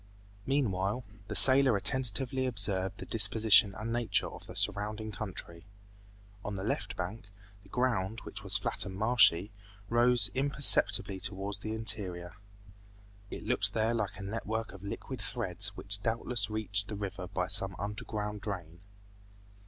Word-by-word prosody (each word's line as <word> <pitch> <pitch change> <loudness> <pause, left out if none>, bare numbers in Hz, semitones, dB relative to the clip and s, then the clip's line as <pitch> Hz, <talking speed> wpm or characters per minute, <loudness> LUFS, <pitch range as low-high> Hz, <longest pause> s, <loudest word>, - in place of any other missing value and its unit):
Meanwhile, 115 -4 0 0.2
the 105 - -5
sailor 130 +1 +6
attentively 130 +3 0
observed 100 -4 +1
the - - -8
disposition 105 -2 +4
and 110 +3 -4
nature 120 -1 +1
of - - -11
the - - -10
surrounding 105 +1 -2
country. 90 -4 -6 0.8
On 105 - -4
the 95 - -4
left 100 -1 -3
bank, 105 +5 -6 0.3
the 100 - -20
ground, 115 -3 -1
which 100 - -9
was 100 +2 +4
flat 100 - -2
and 95 -1 -7
marshy, 105 -3 +4 0.4
rose 120 -2 +4
imperceptibly 105 -8 +4
towards 100 +1 -2
the 110 +1 -4
interior. 90 -5 -1 1.0
It - - -8
looked - - +1
there 110 +1 +1
like 105 -3 -3
a 100 - -8
network 110 +2 -4
of 100 - -12
liquid 100 - -6
threads - - -3
which 100 +1 -1
doubtless 115 -1 0
reached 105 -1 -2
the 105 - -5
river 95 -2 -5
by 90 0 -2
some 95 +1 0
underground 105 +1 -5
drain. 90 -5 -6
105 Hz, 145 wpm, -31 LUFS, 95-115 Hz, 1.0 s, sailor